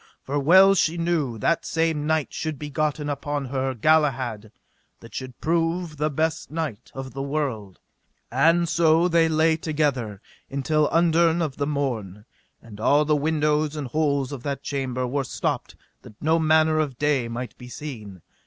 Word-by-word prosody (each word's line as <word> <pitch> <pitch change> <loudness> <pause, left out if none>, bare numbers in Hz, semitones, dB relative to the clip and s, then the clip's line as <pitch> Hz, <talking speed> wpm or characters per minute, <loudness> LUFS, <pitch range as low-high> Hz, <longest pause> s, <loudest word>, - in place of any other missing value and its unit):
For 145 +2 -2
well 190 +7 +7
she 170 -3 +1
knew 165 -8 -1
that 165 +10 +1
same 160 -2 0
night 160 -2 0
should 155 -2 -3
be 150 +1 -7
gotten 150 +1 -1
upon 145 0 -3
her 130 0 -2
Galahad 125 -6 +1 0.5
that - - -14
should 130 -2 -7
prove 165 0 -1
the 150 +2 0
best 160 +2 -1
knight 150 -8 -5
of 135 -2 -7
the 135 - -4
world; 135 -10 -3 0.5
and 165 +7 +3
so 165 +1 +3
they 165 -2 +3
lay 160 0 +3
together 145 - -1 0.3
until 150 +2 +1
underne 165 0 +3
of 145 -4 -4
the 140 - -1
morn; 115 -9 -3 0.4
and 105 -3 -12
all 145 +6 +3
the 150 0 +2
windows 150 0 +1
and 145 -4 -4
holes 140 -2 0
of 140 -4 -6
that 140 0 -4
chamber 130 -3 -2
were 135 +3 -1
stopped 130 - -3 0.3
that 105 - -15
no 160 +2 +2
manner 155 0 +3
of 140 -5 -2
day 145 -4 +1
might 120 0 -6
be 125 - -10
seen. 110 - -8
150 Hz, 165 wpm, -24 LUFS, 130-160 Hz, 0.5 s, well